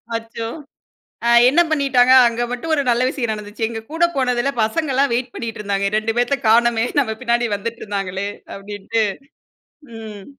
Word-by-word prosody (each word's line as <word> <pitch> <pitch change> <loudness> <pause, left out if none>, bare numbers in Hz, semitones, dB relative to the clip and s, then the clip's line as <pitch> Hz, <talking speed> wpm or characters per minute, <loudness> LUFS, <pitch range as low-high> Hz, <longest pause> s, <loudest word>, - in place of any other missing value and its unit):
அச்சோ! 230 0 -5 0.8
அ - - +4 0.2
என்ன 335 +6 +4
பண்ணிட்டாங்க. 270 -5 +3 0.2
அங்க 235 0 -2
மட்டும் 250 +7 -4
ஒரு 285 - +1
நல்ல 240 +1 +2
விசயம் 240 -5 -2
நடந்துச்சு. 210 +1 -9
எங்க 225 -1 -5
கூட 325 +2 0
போனதுல 250 0 +1
பசங்கலாம் 275 +3 0
வெயிட் 245 +1 -2
பண்ணிட்ருந்தாங்க. 210 -4 -3
"ரெண்டு - - +4
2 220 +1 -1
பேத்த 245 +3 +2
காணமே 230 0 +4 0.2
நம்ம 220 -6 0
பின்னாடி 240 -1 +1
வந்துட்ருந்தாங்களே" 200 -3 -4 0.3
அப்டின்ட்டு 205 +2 -4 1.0
ம். 210 -3 -9
235 Hz, 145 wpm, -19 LUFS, 215-255 Hz, 1.0 s, அ